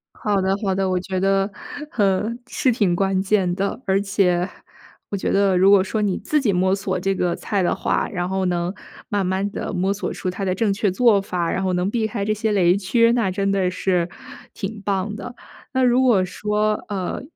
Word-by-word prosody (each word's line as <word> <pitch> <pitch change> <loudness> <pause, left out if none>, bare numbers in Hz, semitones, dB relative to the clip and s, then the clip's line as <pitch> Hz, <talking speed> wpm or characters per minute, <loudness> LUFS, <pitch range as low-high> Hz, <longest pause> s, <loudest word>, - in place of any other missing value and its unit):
好 205 -2 0
的 190 0 +1
好 195 -2 +1
的， 190 0 0
我 185 - +1
觉 185 +1 -3
得， 195 +1 +2 0.4
呵， 205 +1 +1
是 255 - +1
挺 200 -6 +1
关 195 0 +1
键 190 -3 +1
的。 200 +5 -2
而 195 0 +2
且， 190 -3 +1 0.6
我 200 - -1
觉 190 - -2
得 195 -2 +3
如 190 +2 +5
果 200 -2 +6
说 215 +2 -2
你 200 -3 0
自 300 - 0
己 215 -6 +2
摸 185 +1 +2
索 195 -1 -2
这 195 +2 0
个 180 -2 0
菜 200 -2 -1
的 175 - +1
话， - - -1
然 180 -2 -3
后 190 0 -1
能 175 +1 -1 0.3
慢 205 -2 0
慢 190 +2 -1
地 - - -5
摸 190 +1 0
索 205 - -4
出 - - -4
它 185 +2 -3
的 185 -1 0
正 205 +1 +1
确 205 0 +1
做 210 +1 +4
法， 175 -3 -2
然 190 - -1
后 190 -1 0
能 180 +2 0
避 225 -1 0
开 205 -2 -3
这 215 +1 0
些 215 +1 -1
雷 180 -3 +4
区， 230 +4 +3
那 230 -5 +1
真 195 +1 -1
的 190 -2 +1
是 180 -2 0 0.4
挺 205 +1 -6
棒 200 +1 -1
的。 245 +2 -8 0.4
那 260 -1 +1
如 250 +1 +4
果 235 -7 +4
说 210 +3 0
呃， 195 0 -3
195 Hz, 230 characters per minute, -22 LUFS, 185-210 Hz, 0.6 s, 果